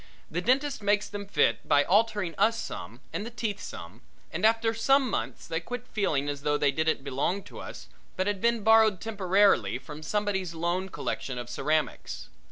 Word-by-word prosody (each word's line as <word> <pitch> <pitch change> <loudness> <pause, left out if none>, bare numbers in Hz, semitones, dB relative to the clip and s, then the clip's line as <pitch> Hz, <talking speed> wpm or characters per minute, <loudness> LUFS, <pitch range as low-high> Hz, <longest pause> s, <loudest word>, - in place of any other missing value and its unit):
The 175 +3 -1
dentist 270 +6 +1
makes 205 0 +2
them 205 -1 -6
fit - - +1
by 145 0 +5
altering 205 -1 +2
us 225 +6 +2
some - - -7
and - - -2
the 230 - -5
teeth 220 -4 -3
some, 90 - -9 0.3
and 170 - -4
after 225 0 +2
some 270 +4 +3
months 125 - -3
they 165 - -1
quit 245 +7 -6
feeling 155 - 0
as 145 -1 -3
though 145 0 +1
they 145 -1 +3
didn't 160 -1 0
belong 145 +8 -1
to - - -11
us - - -9 0.3
but 185 - +1
had 205 -1 -1
been 235 -2 +2
borrowed 220 -3 +5
temporarily 200 -1 +2
from 150 0 -10
somebody's 190 -1 -1
loan 175 +3 -1
collection 130 -7 -4
of 120 0 -6
ceramics. 150 +3 -2
190 Hz, 180 wpm, -28 LUFS, 155-220 Hz, 0.3 s, by